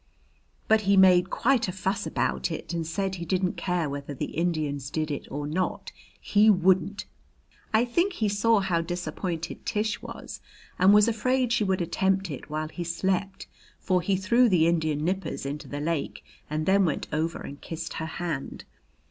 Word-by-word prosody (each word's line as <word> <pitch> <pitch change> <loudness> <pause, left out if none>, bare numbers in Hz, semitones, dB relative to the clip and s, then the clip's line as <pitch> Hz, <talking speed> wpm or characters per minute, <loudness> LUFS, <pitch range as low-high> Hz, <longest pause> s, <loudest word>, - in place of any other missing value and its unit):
But 220 0 +4
he 200 - +5
made 185 -1 +6
quite 250 -3 +2
a - - -2
fuss 190 +3 -2
about - - -1
it, 165 +1 -5
and 165 -2 -2
said 190 +3 -2
he 175 -2 -5
didn't 185 +1 0
care 180 -4 -1
whether 140 0 -5
the - - -4
Indians 155 -5 -1
did 155 0 -2
it 145 - -5
or 145 +1 -4
not, 175 +5 -2 0.3
he 210 +1 +4
wouldn't. 190 +1 +2 0.7
I 225 +2 +3
think 345 +11 +1
he 220 -10 0
saw 205 +1 +3
how 180 -3 +1
disappointed 175 0 -4
Tish 215 +1 -1
was - - -8 0.4
and 185 +2 +6
was 210 +1 +6
afraid 245 +2 +1
she 220 - +2
would 190 -2 0
attempt 190 +1 0
it 140 - -8
while 155 +1 -3
he 175 - -5
slept, 190 +3 -2 0.3
for 185 -2 +1
he 190 +3 +1
threw 235 +6 +3
the 175 -5 +4
Indian 160 -3 +1
nippers 190 -4 -2
into 145 +2 -5
the 145 - -5
lake 155 0 -3 0.2
and 155 +1 -2
then 195 +2 +4
went 160 -5 -1
over 160 +2 -1
and 140 - -9
kissed 165 0 -6
her 160 - -3
hand. 165 -5 -4
180 Hz, 180 wpm, -27 LUFS, 160-200 Hz, 0.7 s, made